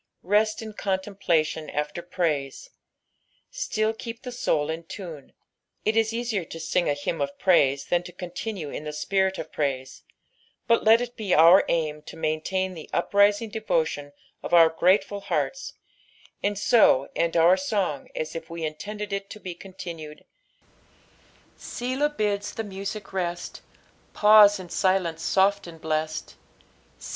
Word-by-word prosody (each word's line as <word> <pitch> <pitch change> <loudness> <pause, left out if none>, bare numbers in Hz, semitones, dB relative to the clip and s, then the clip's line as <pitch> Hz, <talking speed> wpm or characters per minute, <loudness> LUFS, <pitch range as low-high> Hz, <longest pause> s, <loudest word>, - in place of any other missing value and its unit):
Rest 215 +4 +1
in 220 -1 -8
contemplBtion 190 -6 -1
tS\a 150 +3 -3
praise. 170 - -2 0.8
Still 220 - -1
keep 230 +1 -8
the 250 - -6
soul 160 -10 0
in 165 +1 -5
tune. 165 -6 -9 0.5
It 215 - +2
is 225 0 +2
easier 230 -4 -2
to 165 0 -9
sing 175 +1 0
a - - +3
h^mn 145 +3 -3
of 280 0 -3
praise 140 - +3
Ibu 175 0 0
to - - -8
continue 180 -1 -6
in - - -6
the 150 0 -5
spirit 190 +4 0
of 155 - -7
praise, 135 -3 -3 0.6
but 230 0 +3
let 225 +2 +6
it 245 0 -5
be 205 -4 0
our 170 +4 +8
aim 155 -2 -1
to - - -9
maintain 185 +4 -1
the 160 -3 -10
uprisiDg 205 +4 +2
devotion 160 -9 -1 0.3
of 175 - 0
our 165 -1 +8
grUeful 195 +4 +2
heatta, - - -2 0.7
and 205 0 -1
so 195 - +4
end 170 0 +1
our 170 +3 +6
son^f 190 -7 -2
as 155 - -4
if 165 - -7
we 165 -1 -4
intended 205 +7 -5
it 195 0 -3
to 215 - -9
M 185 -3 -6
contiiined, 170 -4 -9 1.4
6b^b 270 +5 -2
bids 205 -1 -1
the 225 - -3
mOBie 200 0 -6
rest, 175 -2 -3 0.5
Psueo 210 -1 +7
In 185 - -8
ailence 175 -1 0
loft 200 0 +3
and 165 -1 -11
blest; 155 0 -3 0.6
BU. - - -11
185 Hz, 150 wpm, -25 LUFS, 160-210 Hz, 1.4 s, our